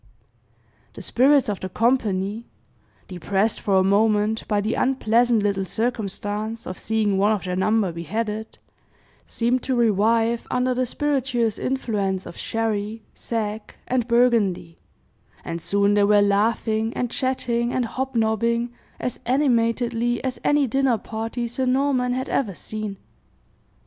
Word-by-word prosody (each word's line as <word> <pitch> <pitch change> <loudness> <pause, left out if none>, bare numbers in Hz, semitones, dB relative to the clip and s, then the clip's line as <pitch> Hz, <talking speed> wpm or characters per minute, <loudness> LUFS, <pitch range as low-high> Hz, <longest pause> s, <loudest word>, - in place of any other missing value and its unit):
The - - -9
spirits 275 +2 +4
of 205 -3 -2
the 185 - -5
company 220 -1 0 0.6
depressed 195 +4 -1
for 200 -3 0
a 190 - +4
moment 210 +2 +2
by 210 -2 +1
the 215 +3 -1
unpleasant 240 -3 +2
little 200 -2 0
circumstance 215 0 -3
of 185 - -6
seeing 215 -3 0
one 205 +2 +3
of 210 - -3
their 180 -1 -3
number 205 0 +1
beheaded 215 +6 -4 0.7
seemed 245 +2 0
to 260 - -1
revive 230 +1 +2
under 250 0 +1
the 255 0 0
spirituous 255 -6 0
influence 205 -8 -1
of - - -9
sherry, 220 -1 -2
sack, 215 -2 -4
and 245 -2 0
burgundy; 225 -8 +2 0.7
and 165 0 -4
soon 200 +2 +2
they 205 0 +4
were 205 0 +5
laughing, 220 +2 +1
and 245 -1 -2
chatting, 240 -2 -1
and 250 -1 0
hobnobbing, 235 -1 0 0.3
as 250 - -4
animatedly 240 -2 +1
as 260 -1 -3
any 290 -1 +3
dinner 265 -1 +1
party 225 +3 -4
Sir 255 +2 -2
Norman 255 -1 +1
had 260 +1 -2
ever 210 -9 -1
seen. 215 0 -5
225 Hz, 135 wpm, -23 LUFS, 205-245 Hz, 0.7 s, were